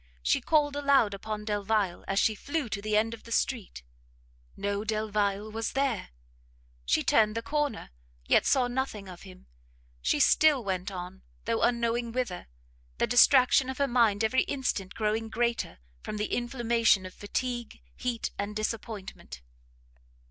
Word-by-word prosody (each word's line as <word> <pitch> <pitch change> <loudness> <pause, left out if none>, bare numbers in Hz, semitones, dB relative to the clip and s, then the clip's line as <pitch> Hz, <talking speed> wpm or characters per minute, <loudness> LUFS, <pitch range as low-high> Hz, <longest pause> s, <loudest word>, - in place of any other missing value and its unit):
She 60 - +2
called 295 -2 +2
aloud 280 -7 +3
upon 210 +1 -5
Delvile 205 -3 -1
as 195 - -1
she 220 - +3
flew 285 +4 -3
to 200 -1 -3
the 210 0 +1
end 225 +2 +1
of 230 - -9
the 230 - -13
street. 225 - -2 0.7
No 200 +1 -2
Delvile 215 -1 -1
was 225 +1 -3
there! 270 -6 -1 0.8
she - - +2
turned 215 0 +3
the 230 - -3
corner; 295 - -2 0.4
yet - - +4
saw 255 -3 +3
nothing 245 -5 -3
of 180 -2 -10
him; 185 -1 -14 0.6
she - - +1
still 300 -5 +4
went 185 -1 -2
on, 185 0 -7 0.2
though 230 0 0
unknowing 235 0 +1
whither, 240 -7 -3 0.5
the - - +2
distraction 255 +2 +5
of 265 - -4
her 280 - +1
mind 230 -4 +3
every 240 +4 +3
instant 210 -9 -2
growing 220 +1 -1
greater, 235 +1 -1 0.2
from 215 - -5
the 210 0 -2
inflammation 235 -5 +2
of 185 - -8
fatigue, 240 +2 -4 0.2
heat, 245 -2 -3
and 205 +1 -3
disappointment. 210 - -5
220 Hz, 150 wpm, -28 LUFS, 200-245 Hz, 0.8 s, distraction